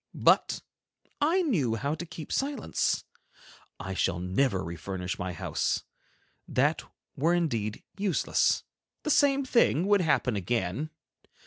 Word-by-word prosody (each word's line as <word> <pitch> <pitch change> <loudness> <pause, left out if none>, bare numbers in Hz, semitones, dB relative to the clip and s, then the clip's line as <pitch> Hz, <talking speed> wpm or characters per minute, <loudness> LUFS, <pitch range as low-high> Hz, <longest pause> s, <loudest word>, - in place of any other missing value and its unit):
but - - +3 0.6
I 340 +6 +3
knew 150 - +1
how 140 +6 -1
to 170 +2 -5
keep 160 -2 -8
silence. 275 -3 0 0.8
I 95 - -4
shall 95 -1 +1
never 95 +3 +1
refurnish 90 +2 -4
my 95 -1 -2
house. 85 - -1 0.6
That - - +2 0.3
were 165 +5 +2
indeed 115 -12 -1 0.2
useless. 200 -3 +2 0.4
The 305 - 0
same 280 -1 +4
thing 235 - +3
would 205 -1 +4
happen 140 -7 +2
again. 105 - -1
140 Hz, 120 wpm, -29 LUFS, -, 0.8 s, same